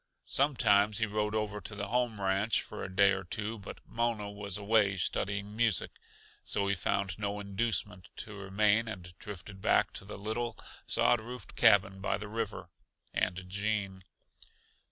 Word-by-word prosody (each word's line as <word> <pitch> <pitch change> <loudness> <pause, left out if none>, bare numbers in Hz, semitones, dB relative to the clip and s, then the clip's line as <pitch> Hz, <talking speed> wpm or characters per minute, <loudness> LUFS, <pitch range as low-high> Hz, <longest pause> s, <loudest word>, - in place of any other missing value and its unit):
Sometimes 105 -7 +3
he 110 - +2
rode 105 0 -1
over 105 -1 -1
to 105 - -6
the 100 0 -3
home 120 -3 0
ranch 100 +3 +2
for - - -7
a - - -4
day 100 +1 +5
or 95 0 -1
two, 105 +5 -3
but 100 - -9
Mona 115 -3 -1
was 100 -2 -4
away 100 -1 +3
studying 100 +4 -2
music, 110 -5 +2 0.5
so 100 -1 0
he 100 - +2
found 95 +1 -1
no 100 0 -2
inducement 100 -1 -2
to 105 - -7
remain, 105 +3 +2
and 90 -5 -7
drifted 95 -1 -8
back - - +3
to - - -8
the 100 - -8
little, 110 +3 -3 0.3
sod 120 - +4
roofed 125 +2 -9
cabin 100 -4 +5
by 95 - 0
the 105 +1 -7
river, 110 -1 -4 0.4
and 90 - +1
to 95 - -6
Gene. 100 0 -2
105 Hz, 165 wpm, -32 LUFS, 95-110 Hz, 0.5 s, day